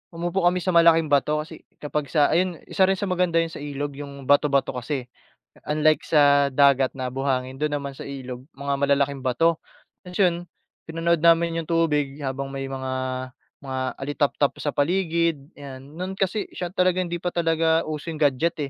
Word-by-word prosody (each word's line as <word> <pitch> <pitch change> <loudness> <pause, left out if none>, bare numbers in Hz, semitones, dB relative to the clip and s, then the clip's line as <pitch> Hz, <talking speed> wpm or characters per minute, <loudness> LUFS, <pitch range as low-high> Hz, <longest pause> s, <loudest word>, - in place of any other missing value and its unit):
umupo 175 +2 -1
kami 180 +1 +2
sa 185 - +1
malaking 165 -2 +5
bato, 150 +2 +2
kasi 160 0 -12 0.2
kapag 150 0 -2
sa 145 +2 +2
ayan 175 -1 +1
isa 190 -1 +3
rin 195 - +2
sa - - -3
maganda 180 -2 +2
'yan 165 - -6
sa - - -8
ilog 145 0 -4
yung 140 -1 -8
bato-bato 145 0 +3
kasi, 130 +1 -4 0.7
unlike 155 +1 +3
sa 145 -2 +5
dagat 140 -1 +3
na 130 -1 -3
buhangin, 130 0 -2
dun 150 -1 0
naman 140 -1 -5
sa - - -9
ilog 130 -2 -7
mga 140 0 -2
malalaking 140 0 +1
bato. 165 +6 +2 0.5
Tapos 180 - -9
yun 180 -3 +4 0.5
pinanood 165 0 0
namin 165 0 +4
yung - - -16
tubig 150 -4 +1
habang 135 +1 -3
may 135 0 -4
mga 130 -1 -4 0.7
mga 130 -1 -4 0.2
alitaptap 145 0 0
sa 145 - -2
paligid 170 0 +1 0.2
ayan. 135 -2 -9 0.2
No'n 185 +1 -4
kasi 195 +2 -1
siya 175 -2 -4
talagang 185 -1 +1
hindi 175 - -2
pa 180 - -3
talaga 165 -1 +2
uso 155 +1 -5
yung 155 - -7
gadget, 150 +5 +2
150 Hz, 175 wpm, -24 LUFS, 140-170 Hz, 0.7 s, malaking